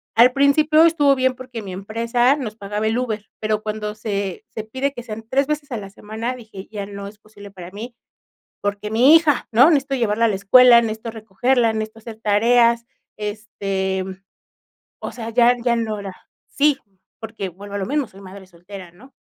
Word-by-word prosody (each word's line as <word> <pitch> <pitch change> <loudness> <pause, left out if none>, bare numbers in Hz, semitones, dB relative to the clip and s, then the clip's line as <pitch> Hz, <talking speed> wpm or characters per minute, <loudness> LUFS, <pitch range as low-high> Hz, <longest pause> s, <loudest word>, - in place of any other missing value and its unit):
Al 240 +2 +7
principio 300 +4 +4
estuvo 290 -4 +4
bien 260 0 +1
porque 250 -3 -8
mi 190 -2 -7
empresa 230 +6 +1
nos 235 -8 -5
pagaba 210 0 -4
el 220 +2 +1
Uber, 220 -4 -4
pero 215 0 -1
cuando 210 0 -4
se 200 -2 -4
se 220 -1 -6
pide 260 +6 -3
que 245 - -7
sean 225 -1 -8
3 270 +3 +1
veces 300 -1 -3
a 240 - -2
la 200 -2 -8
semana, 220 +5 -5
dije, 215 -5 -11
ya 205 -2 -5
no 200 0 -8
es 205 +1 -12
posible 205 -1 -14
para 180 -2 -11
mí, 230 +5 -8 0.7
porque 205 +1 -3
mi 255 +8 +7
hija, 305 -5 +1
¿no? 245 +6 +6
Necesito 275 -3 +1
llevarla 230 -1 +1
a - - +2
la 205 - 0
escuela, 240 +5 +7
necesito 220 0 -4
recogerla, 225 +3 0
necesito 220 0 -5
hacer 220 -1 -10
tareas, 235 +2 +3 0.3
este, 195 -3 -3 0.9
o - - -6
sea, 230 -2 -6
ya 240 +1 +4
ya 240 -1 +2
no 220 -2 -2
era 195 -2 -7 0.3
sí, 290 -1 +2 0.4
porque 220 -3 -5
vuelvo 200 +3 -9
a - - -2
lo 190 - -3
mismo, 285 -2 -1
soy 195 - -16
madre 190 0 -12
soltera, 180 +1 -11
¿no? 250 +11 -18
220 Hz, 190 wpm, -21 LUFS, 205-250 Hz, 0.9 s, Al